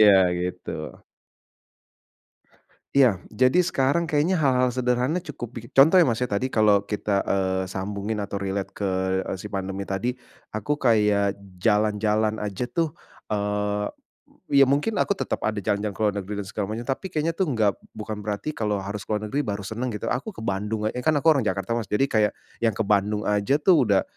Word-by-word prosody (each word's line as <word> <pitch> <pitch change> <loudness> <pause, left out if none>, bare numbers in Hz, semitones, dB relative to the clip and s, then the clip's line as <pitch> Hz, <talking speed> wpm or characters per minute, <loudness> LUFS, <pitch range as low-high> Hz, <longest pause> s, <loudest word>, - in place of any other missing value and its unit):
Iya 105 -2 +8 0.3
gitu. 90 0 -4 2.3
Ya, 120 -9 +4
jadi 130 +11 +4
sekarang 155 -1 +1
kayaknya 160 +3 +1
hal-hal 130 -6 +3
sederhana 125 +6 0
cukup, 130 -4 -6
pi 120 - -4
contoh 145 +7 +6
ya, 180 - +8
Mas, 120 -6 0
tadi 125 +1 -1
kalau 105 -2 +4
kita, 100 -1 -1
eee, 95 -1 0
sambungin 100 +3 -3
atau 100 0 -4
relate 100 0 -2
ke, 100 -2 -1 0.3
eee, - - -4
si 105 - -6
pandemi 95 -1 -4
tadi, 100 +6 -1 0.4
aku 110 +8 -1
kayak 105 -6 +2 0.2
jalan-jalan 105 +2 +1
aja 105 +3 -3
tuh 160 +5 -1 0.4
eee, 105 0 -1 0.6
ya 140 -1 +6
mungkin 145 +10 +1
aku 200 - +2
tetap - - -2
ada 110 - -1
jalan-jalan 100 +1 -1
ke - - -7
luar 105 -1 +2
negeri 100 +1 -6
dan - - -12
segala 105 -2 -2
macem, 115 - -5
tapi 135 +9 -3
kayaknya 160 -2 -1
tuh 185 +2 -1
nggak 110 -8 +1 0.2
bukan 105 0 -5
berarti 105 +7 -3
kalau 105 -6 -1
harus 100 0 -6
ke - - -34
luar 105 - -3
negeri 140 - 0
baru 105 -8 -2
seneng 110 +6 -3
gitu. - - -3
Aku 135 - -3
ke 110 - -8
Bandung 105 +2 -2
eee, - - -5
kan 155 +4 +2
aku 160 +3 +5
orang 135 -7 +2
Jakarta, 95 +1 -2
Mas, 115 -4 -1
jadi 105 +6 +1
kayak 105 -2 +2 0.2
yang 115 -3 +1
ke 110 - 0
Bandung 105 +1 +1
aja 105 +5 +1
tuh 150 - +4
udah 100 -2 +3
110 Hz, 185 wpm, -25 LUFS, 100-130 Hz, 2.3 s, Iya